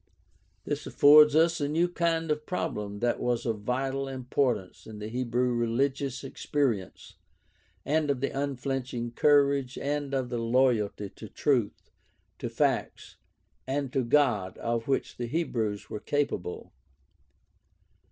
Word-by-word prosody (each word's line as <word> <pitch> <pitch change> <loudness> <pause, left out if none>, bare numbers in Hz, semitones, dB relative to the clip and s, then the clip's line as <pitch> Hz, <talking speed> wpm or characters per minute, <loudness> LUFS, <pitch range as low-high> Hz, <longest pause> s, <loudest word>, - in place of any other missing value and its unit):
This - - -4
affords 150 +1 +7
us 165 0 +3
a 145 - 0
view 165 +3 +2
of 175 - -5
the - - -24
kind 165 -2 0
of 150 0 -2
problem 105 - -3
that 120 0 +1
was 120 -1 -1
of 115 -3 -1
vital 135 +4 -2
importance 125 -6 -2
in 110 -1 -9
the 105 +1 -6
Hebrew 125 +1 0
religious 130 +3 -1
experience 130 - -2 0.7
and 150 0 +1
of 140 -3 +1
the 140 - -1
unflinching 135 -3 -3
courage 140 -1 +3
and 145 -1 -2
of 130 -2 -1
the 120 -1 -2
loyalty 115 -4 +1
to 110 - -11
truth, 125 -8 -1 0.5
to - - -3
facts, - - -1 0.5
and 135 -1 -2
to 135 - +2
God 115 -8 +2
of 115 -1 -2
which 135 - -1
the 120 - -3
Hebrews 115 -8 -2
were 105 - -4
capable. 140 -10 -2
130 Hz, 140 wpm, -28 LUFS, 115-145 Hz, 0.7 s, affords